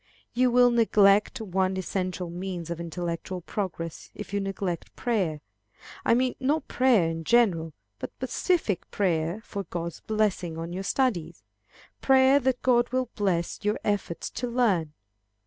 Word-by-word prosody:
You 250 +1 +3
will 245 0 +5
neglect 210 -3 +4
one 190 -2 0
essential 185 -1 -3
means 175 -1 -5
of 170 - -4
intellectual 170 +1 -4
progress, 165 -4 -5
if 210 - -8
you 200 - +1
neglect 195 -3 -4
prayer. 190 - -1 0.6
I 230 - +4
mean, 255 0 +1
not 285 +3 0
prayer 245 -9 +3
in 165 0 -3
general, 175 -7 +2 0.3
but - - -4
specific 315 - 0
prayer 175 0 0
for 200 -3 -5
God's 170 -1 -5
blessing 205 -6 -1
on 165 +1 -5
your 185 - -3
studies; 195 - -1 0.6
prayer 265 +1 +5
that 260 -1 -1
God 240 -1 +3
will 255 -1 -1
bless 180 -5 -1
your 210 +1 0
efforts 200 -5 -2
to 245 - -3
learn. 205 -11 +1
195 Hz, 145 wpm, -27 LUFS, 170-240 Hz, 0.6 s, will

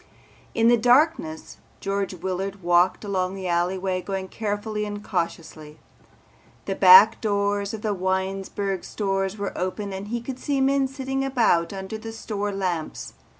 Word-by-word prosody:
In 225 0 +3
the 240 0 +6
darkness 245 - +2 0.2
George 195 -1 -2
Willard 190 +2 -4
walked 175 +4 +3
along 190 -1 -1
the 190 -1 -5
alleyway, 185 +2 0
going 190 0 -4
carefully 210 0 -3
and 205 0 -5
cautiously. 160 -5 -4 0.9
The - - -1
back 465 +1 +8
doors 200 -1 0
of 215 - -10
the 215 -2 0
Winesburg 190 +1 -2
stores 195 -1 -2
were 200 -1 -4
open 195 +2 -3
and 195 +2 -6
he 235 +2 -2
could 255 +2 -7
see 280 0 -1
men 270 0 +2
sitting 270 0 -3
about 235 -11 +2
under 195 +2 -6
the 225 0 -7
store 205 -2 -3
lamps. 180 -5 -3
200 Hz, 150 wpm, -24 LUFS, 185-220 Hz, 0.9 s, back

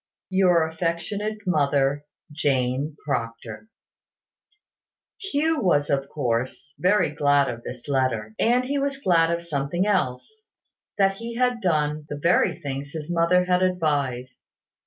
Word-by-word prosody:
"Your 180 -3 +4
affectionate 175 +6 -3
mother, 145 -4 +1 0.3
"Jane 140 0 -1
Proctor." 115 - -4 1.5
Hugh 320 -5 0
was, 145 -7 +2
of 140 0 0
course, 130 0 -3
very 185 -4 +3
glad 145 -1 +3
of 120 -1 -5
this 125 +2 -9
letter. 130 -6 0
And 245 +2 +3
he 280 +2 -1
was 275 0 -1
glad 170 -10 +3
of 170 0 -1
something 155 +3 -1
else; 205 - -2 0.5
that 195 -1 +2
he 230 +1 -6
had 250 -1 +1
done 150 -4 0
the 145 - -4
very 170 +5 +2
things 140 +1 -5
his 160 +1 -5
mother 175 +1 +3
had 180 0 +2
advised. 145 -9 -1
160 Hz, 130 wpm, -24 LUFS, 140-190 Hz, 1.5 s, Your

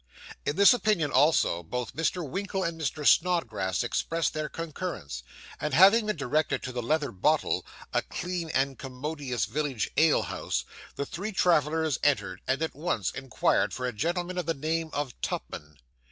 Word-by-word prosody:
In 145 - +1
this 200 +6 +8
opinion 210 - +1
also, 135 - +3
both 125 +8 -5
Mr. 165 +1 -1
Winkle 195 +4 -2
and 165 -2 -3
Mr. 150 0 -2
Snodgrass 115 - +2
expressed 165 0 -1
their 155 -1 -3
concurrence; 155 - -5 0.4
and 150 -3 -1
having 200 +5 +7
been 210 - 0
directed 150 +1 0
to 130 - -4
the 125 -1 -3
Leather 150 +5 0
Bottle, 95 - +1 0.3
a - - +3
clean 180 -2 -4
and 135 -1 0
commodious 135 -2 -3
village 130 +1 -2
ale 160 -1 +5
house, - - -3 0.3
the 140 - -2
three 195 +9 -5
travellers 160 - +2
entered, 145 -2 +1
and 135 +4 +1
at 160 - -2
once 140 - -1
inquired 135 -3 0
for 130 - -3
a 125 - -2
gentleman 175 - -2
of 175 - -4
the 165 - +1
name 160 +3 -1
of 145 -3 -3
Tupman. 75 -1 -5
150 Hz, 165 wpm, -28 LUFS, 130-170 Hz, 0.4 s, this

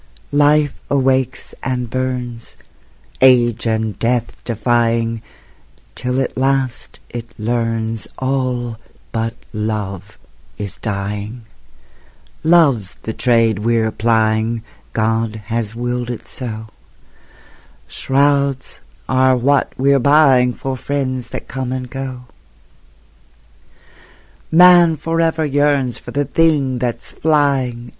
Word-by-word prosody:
Life 145 0 +4 0.2
awakes 130 -2 0
and 125 -2 -2
burns, 125 -1 -4 0.6
Age 120 -3 +4
and 110 -3 -1
death 120 0 0
defying, 115 -1 0 0.7
Till 125 +1 -2
at 135 - -2
last 130 -2 -1
it 120 0 -6
learns 115 -1 -2
All 125 -3 -2 0.3
but 115 0 -2 0.2
Love 105 -3 -4 0.4
is 100 -2 -6
dying; 105 +2 -4 1.0
Love's 150 - +3
the 110 - -4
trade 115 -4 +2
we're 115 0 +1
plying, 110 0 +1 0.3
God 115 0 0 0.2
has 115 -1 -2
willed 120 0 -2
it 120 - -6
so; 110 -4 -6 1.2
Shrouds 140 -1 0 0.3
are 130 0 +3
what 140 +3 +2
we're 140 +1 +3
buying 135 -3 +5
For 135 +1 -4
friends 130 -2 -3
that - - -7
come 130 0 -4
and 130 -1 -3
go. 130 0 -6 2.3
Man 175 -1 +7
forever 165 +1 0
yearns 145 -3 +1
For - - -11
the 145 0 -1
thing 140 -4 +2
that's 120 -1 -3
flying. 135 -6 0
125 Hz, 100 wpm, -18 LUFS, 115-135 Hz, 2.3 s, Man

